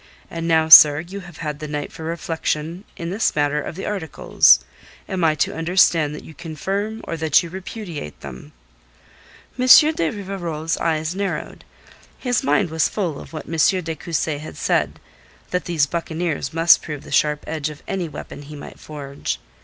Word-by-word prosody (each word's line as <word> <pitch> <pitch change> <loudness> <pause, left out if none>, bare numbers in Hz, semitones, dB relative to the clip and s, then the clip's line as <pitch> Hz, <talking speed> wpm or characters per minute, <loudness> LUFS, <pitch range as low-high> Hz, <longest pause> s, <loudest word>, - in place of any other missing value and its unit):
And 165 0 -4
now, 160 -1 +3
sir, 150 -2 +10
you 185 +4 -8
have 175 -4 -12
had 150 -1 -4
the 155 - -6
night 145 -1 -4
for - - -11
reflection 165 +2 -3
in 170 0 -5
this 205 +4 0
matter 145 0 +1
of 155 - -7
the 190 - -6
articles. 160 - +3 0.4
Am 185 -2 -2
I 155 -1 +3
to - - 0
understand 165 -2 +2
that - - -9
you 160 - -12
confirm 195 +8 -4
or - - -4
that 160 +1 +3
you 170 - -8
repudiate 180 - -7
them?" 65 -2 -10 1.1
M. 255 - +1
de 300 - +7
Rivarol's 175 -6 -4
eyes 160 0 -1
narrowed. 195 +1 -4 0.5
His 245 -3 0
mind 205 - +1
was 160 0 +1
full 175 -9 -3
of - - -12
what 155 -2 -7
M. 165 - -5 0.3
de 160 0 -4
Cussy 155 -1 -2
had 155 - -9
said - - 0 0.5
that 180 -3 -1
these 165 -4 +2
buccaneers 160 -2 -3
must 165 +1 +5
prove 150 -2 -7
the - - -12
sharp 150 -1 +1
edge 155 -1 -3
of 150 -1 -12
any 185 -4 -3
weapon 145 0 -9
he 150 +1 -10
might 145 - -11
forge. 140 -2 -6
160 Hz, 175 wpm, -21 LUFS, 150-180 Hz, 1.1 s, sir